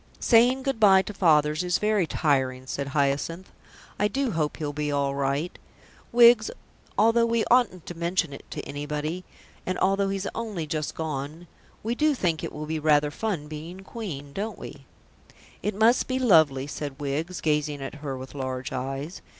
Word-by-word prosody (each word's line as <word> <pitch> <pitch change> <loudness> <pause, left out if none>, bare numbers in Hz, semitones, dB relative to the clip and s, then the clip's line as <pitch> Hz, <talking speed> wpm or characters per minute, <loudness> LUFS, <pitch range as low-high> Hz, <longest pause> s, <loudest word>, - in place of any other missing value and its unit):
"Saying 245 +3 +4
good 270 -4 -1
bye 190 -3 +6
to 210 - -7
fathers 155 -4 +3
is 180 0 +1
very 210 -4 +1
tiring," 130 -5 0
said 140 +1 -4
Hyacinth. 145 +5 -1 0.5
"I 205 - +3
do 270 +2 -1
hope 155 -4 -1
he'll 150 -2 -3
be 150 0 -2
all 140 -1 0
right. 140 +4 -1 0.6
Wiggs, 235 -2 +6 0.5
although 230 +2 +4
we 230 -1 +1
oughtn't 235 -9 +3
to - - -6
mention 170 -2 -1
it - - -9
to - - -5
anybody, 150 +4 -4 0.4
and 185 - -2
although 195 0 +2
he's 195 0 -2
only 215 -8 -4
just 155 -1 -3
gone, 155 +1 -4 0.4
we 225 +2 -1
do 300 +3 +2
think 170 -9 -1
it - - -3
will 150 0 -6
be 160 +1 -2
rather 150 -1 +3
fun 180 -4 -3
being 160 +5 -8
Queen, 165 -10 -7
don't 215 +3 -4
we?" - - -10 0.7
"It 210 - -2
must 225 +4 +4
be 255 - -1
lovely," 160 - +4
said 145 -1 -6
Wiggs, 150 +5 -3
gazing 150 -1 0
at 135 - -6
her 135 -3 -4
with 130 0 -9
large 130 -2 -4
eyes. 135 +6 -4
160 Hz, 175 wpm, -26 LUFS, 145-205 Hz, 0.7 s, bye